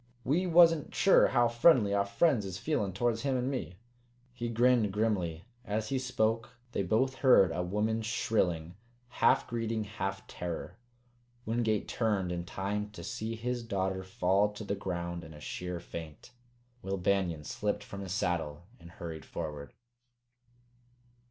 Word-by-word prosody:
We 170 Hz, +8 st, +1 dB
wasn't 165 Hz, -3 st, +5 dB
sure 195 Hz, -, +6 dB
how 120 Hz, -2 st, +3 dB
friendly 120 Hz, -3 st, +4 dB
our 100 Hz, 0 st, +2 dB
friends 135 Hz, 0 st, +2 dB
is 95 Hz, -2 st, -5 dB
feelin' 105 Hz, -4 st, -1 dB
towards 115 Hz, +3 st, 0 dB
him 135 Hz, -2 st, 0 dB
an' 125 Hz, +2 st, -1 dB
me." 110 Hz, -9 st, -4 dB, 0.6 s
He 120 Hz, -1 st, -4 dB
grinned 115 Hz, -2 st, +3 dB
grimly. 95 Hz, -6 st, -1 dB, 0.2 s
As 110 Hz, 0 st, -2 dB
he 135 Hz, -1 st, 0 dB
spoke 115 Hz, -2 st, -1 dB, 0.2 s
they -, -, -1 dB
both 130 Hz, +8 st, +1 dB
heard 110 Hz, -10 st, +6 dB
a 85 Hz, +2 st, -1 dB
woman's 110 Hz, +4 st, -1 dB
shrilling, 90 Hz, -8 st, 0 dB, 0.4 s
half 115 Hz, -, +3 dB
greeting, 115 Hz, -1 st, -2 dB
half 95 Hz, -2 st, -4 dB
terror. 90 Hz, +3 st, -6 dB, 0.7 s
Wingate 110 Hz, -2 st, 0 dB
turned 105 Hz, -6 st, 0 dB
in 85 Hz, -1 st, -3 dB
time 105 Hz, +3 st, -3 dB
to 85 Hz, -4 st, -9 dB
see 110 Hz, +6 st, -4 dB
his 120 Hz, +2 st, -2 dB
daughter 95 Hz, -4 st, -2 dB
fall 95 Hz, +2 st, +2 dB
to 105 Hz, -, -7 dB
the 100 Hz, -, -2 dB
ground 85 Hz, -3 st, -4 dB
in 80 Hz, -1 st, -11 dB
a -, -, -11 dB
sheer 90 Hz, +4 st, -5 dB
faint. 80 Hz, +5 st, -9 dB, 0.5 s
Will 95 Hz, +1 st, -2 dB
Banion 90 Hz, -4 st, 0 dB
slipped -, -, -2 dB
from 100 Hz, -, -8 dB
his 95 Hz, -2 st, -6 dB
saddle 85 Hz, -5 st, -1 dB, 0.2 s
and 85 Hz, -, -13 dB
hurried 80 Hz, -5 st, -7 dB
forward. 75 Hz, -3 st, -6 dB
105 Hz, 150 wpm, -31 LUFS, 90-115 Hz, 0.7 s, sure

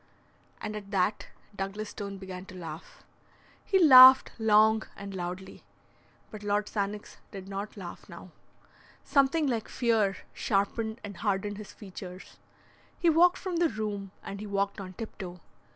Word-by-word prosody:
And 215 Hz, 0 st, -5 dB
at 205 Hz, -2 st, -8 dB
that 200 Hz, +1 st, 0 dB, 0.3 s
Douglas 200 Hz, +2 st, -4 dB
Stone 200 Hz, -2 st, -6 dB
began 190 Hz, -1 st, -8 dB
to 185 Hz, -, -11 dB
laugh. 165 Hz, -2 st, -9 dB, 0.6 s
He 390 Hz, -, +2 dB
laughed 260 Hz, -6 st, +9 dB
long 220 Hz, 0 st, +5 dB
and 200 Hz, 0 st, -8 dB
loudly. 185 Hz, +1 st, -6 dB, 0.7 s
But 215 Hz, -, -9 dB
Lord 205 Hz, 0 st, 0 dB
Sannox 205 Hz, 0 st, -4 dB
did 195 Hz, -1 st, -9 dB
not 200 Hz, +2 st, -6 dB
laugh 175 Hz, -3 st, -9 dB
now. -, -, -11 dB, 0.7 s
Something 285 Hz, +2 st, +3 dB
like 235 Hz, -5 st, -2 dB
fear 220 Hz, -6 st, +1 dB, 0.2 s
sharpened 220 Hz, +3 st, -1 dB
and 200 Hz, -3 st, -8 dB
hardened 205 Hz, +1 st, -2 dB
his 210 Hz, -, -9 dB
features. 185 Hz, -2 st, -11 dB, 0.6 s
He 340 Hz, -, +3 dB
walked 350 Hz, +3 st, +5 dB
from 365 Hz, -3 st, -4 dB
the 335 Hz, -1 st, +3 dB
room, 210 Hz, -3 st, -4 dB
and 200 Hz, -, -7 dB
he 210 Hz, -, -6 dB
walked 200 Hz, 0 st, -1 dB
on 185 Hz, -1 st, -8 dB
tiptoe. 185 Hz, -4 st, -8 dB
205 Hz, 145 wpm, -29 LUFS, 195-220 Hz, 0.7 s, laughed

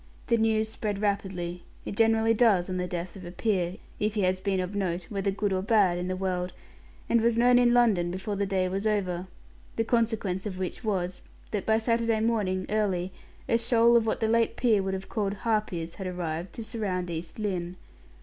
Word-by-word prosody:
The 235 Hz, -, +2 dB
news 220 Hz, -1 st, +2 dB
spread 215 Hz, -2 st, -3 dB
rapidly. 190 Hz, -4 st, -2 dB, 0.2 s
It -, -, -5 dB
generally 225 Hz, +1 st, +4 dB
does 205 Hz, -6 st, +3 dB
on 185 Hz, -, -2 dB
the 180 Hz, 0 st, -1 dB
death 175 Hz, +1 st, -5 dB
of 190 Hz, -, -9 dB
a 175 Hz, -, -7 dB
peer, 185 Hz, -2 st, -1 dB, 0.2 s
if 210 Hz, +1 st, 0 dB
he 210 Hz, -, +1 dB
has 185 Hz, 0 st, +1 dB
been 195 Hz, -1 st, 0 dB
of 185 Hz, +2 st, -3 dB
note, 180 Hz, -3 st, -1 dB
whether 200 Hz, -1 st, -1 dB
good 200 Hz, 0 st, -1 dB
or 185 Hz, -, 0 dB
bad, 195 Hz, -4 st, +3 dB
in 180 Hz, -, -3 dB
the 185 Hz, -, -1 dB
world, 185 Hz, -1 st, -2 dB, 0.5 s
and 235 Hz, -, +3 dB
was 230 Hz, 0 st, +2 dB
known 245 Hz, +1 st, +5 dB
in 240 Hz, -1 st, +4 dB
London 220 Hz, -8 st, +3 dB
before 190 Hz, +4 st, -3 dB
the 200 Hz, 0 st, -1 dB
day 190 Hz, -1 st, +1 dB
was 195 Hz, +3 st, -1 dB
over 185 Hz, -4 st, -1 dB, 0.5 s
the 225 Hz, -, +1 dB
consequence 220 Hz, -5 st, 0 dB
of 190 Hz, -3 st, -5 dB
which 185 Hz, +5 st, -4 dB
was, 185 Hz, -4 st, -2 dB, 0.3 s
that 205 Hz, -3 st, -3 dB
by 220 Hz, 0 st, +4 dB
Saturday 230 Hz, 0 st, +1 dB
morning, 205 Hz, -5 st, 0 dB
early, 190 Hz, -4 st, 0 dB, 0.4 s
a 230 Hz, -, +3 dB
shoal 235 Hz, 0 st, +4 dB
of 230 Hz, -1 st, +4 dB
what 220 Hz, -, -1 dB
the 220 Hz, -, +2 dB
late 230 Hz, +1 st, +2 dB
peer 225 Hz, -5 st, +3 dB
would 190 Hz, 0 st, -2 dB
have 190 Hz, 0 st, -6 dB
called 205 Hz, -2 st, -1 dB
harpies, 205 Hz, -7 st, -1 dB
had 190 Hz, -, -6 dB
arrived, 175 Hz, -1 st, -4 dB
to 230 Hz, -, -6 dB
surround 200 Hz, -6 st, -3 dB
East 165 Hz, 0 st, -6 dB
Lynne. 185 Hz, -4 st, -2 dB
200 Hz, 205 wpm, -28 LUFS, 185-225 Hz, 0.5 s, known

